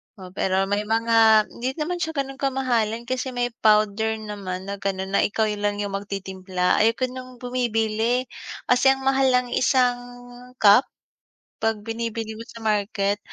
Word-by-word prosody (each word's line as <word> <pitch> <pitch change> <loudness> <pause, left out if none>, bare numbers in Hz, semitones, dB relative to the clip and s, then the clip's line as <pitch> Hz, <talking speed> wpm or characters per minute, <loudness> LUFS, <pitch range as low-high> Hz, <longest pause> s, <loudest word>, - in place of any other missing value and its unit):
Oh, 185 -3 -11
pero 190 0 0
may 205 +2 -1
mga 225 -1 +5
hindi 255 +2 -4
naman 345 +3 -3
siya 320 -2 -3
gano'n 270 -1 -3
kamahalan 240 -5 0
kasi 255 +1 -3
may 245 0 -1
powder 215 +1 +3
naman 200 -4 -6
na 200 0 -5
gano'n 190 -1 -3
na 200 - +2
ikaw 220 +2 0
yung 210 -1 -3
lang 205 0 +1 0.2
magtitimpla. 190 -2 -2
Ayoko 230 +3 +1
ng 255 0 -9
bumibili, 235 0 0 0.4
kasi 250 +2 +5
ang 265 - -9
mahal 270 0 +3
ng 250 0 +1
isang 250 -2 +3 0.6
cup. 210 +5 +6 0.7
'Pag 220 -1 -1
binibili 225 -1 -4
mo 230 - -6
sa 230 -2 -11
market, 205 -1 0
225 Hz, 155 wpm, -23 LUFS, 205-250 Hz, 0.7 s, cup